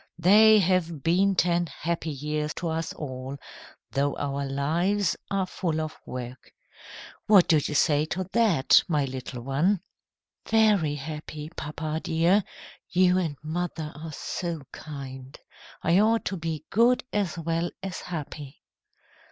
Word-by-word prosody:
They 215 +5 +7
have 175 -6 +1
been 190 +4 +3
ten 175 -1 +2
happy 165 +1 -3
years 150 +1 -3
to 170 - -3
us 160 +1 -2
all, 130 -1 -6 0.5
though 140 +1 0
our 140 0 -2
lives 170 +9 +1
are 195 -1 0
full 170 -3 -2
of 155 0 -4
work. 125 -1 -7 0.8
What 200 -4 +7
do 160 - +5
you 150 0 -2
say 150 -1 +3
to 180 +4 -3
that, 210 - +5
my 150 -5 +1
little 130 -2 -6
one?" 160 +9 +1 0.7
"Very 210 -9 +3
happy, 150 +1 -7
papa 155 +1 -4
dear. 170 +5 +3 0.5
You 185 0 +4
and 160 -6 -2
mother 160 -1 -3
are 155 +2 -7
so 170 0 -4
kind! 135 -2 -9 0.5
I 175 +3 +4
ought 225 +2 +3
to 195 - -2
be 165 -3 -4
good 235 +4 +4
as 200 -5 -1
well 165 +1 -1
as 190 -1 -4
happy." 150 -4 -7
160 Hz, 135 wpm, -26 LUFS, 145-185 Hz, 0.8 s, They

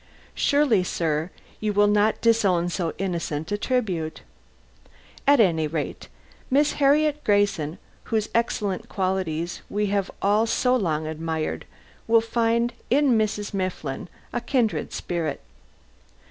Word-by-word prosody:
Surely, 280 -10 +3
sir, 160 -2 -1 0.3
you 215 -1 -1
will 205 +1 +4
not 205 +1 +2
disown 200 -7 +3
so 165 -1 -2
innocent 170 -3 -3
a - - +2
tribute! 205 -9 -2 1.1
At 285 -1 +6
any 165 -7 +3
rate, 150 -1 -4 0.4
Miss 285 +3 +3
Harriet 295 +1 +3
Grayson, 200 -6 +1 0.3
whose 220 -2 0
excellent 225 -2 -1
qualities 185 -4 -2
we 210 +1 0
have 200 -2 0
all 210 +3 +2
so 250 +2 +2
long 160 -9 0
admired, 160 0 -3 0.4
will 230 0 +6
find 230 +1 +1 0.2
in 275 -1 +4
Mrs. 210 -1 -1
Mifflin 180 -6 -3 0.2
a 240 - -1
kindred 235 -2 0
spirit. 165 -4 -3
205 Hz, 120 wpm, -24 LUFS, 170-230 Hz, 1.1 s, At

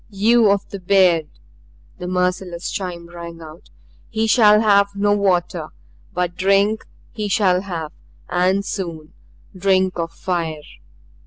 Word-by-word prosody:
"You 220 +2 +3
of 200 0 +1
the 200 - -7
beard," 180 -4 +3 0.7
the 180 - -5
merciless 180 -1 -2
chime 175 -3 -5
rang 170 -1 -9
out, 160 0 -13 0.4
"he 220 0 -1
shall 215 -2 +5
have 200 -2 +3
no 205 +1 +2
water. 185 -4 0 0.4
But 175 -1 -2
drink 195 +3 +2 0.3
he 215 -3 -4
shall 185 -3 +2
have, 165 -6 -5 0.4
and 185 +3 +1
soon 165 -7 -5 0.4
drink 185 -1 +1
of 165 0 -2
fire!" 165 -5 -3
185 Hz, 130 wpm, -20 LUFS, 175-200 Hz, 0.7 s, shall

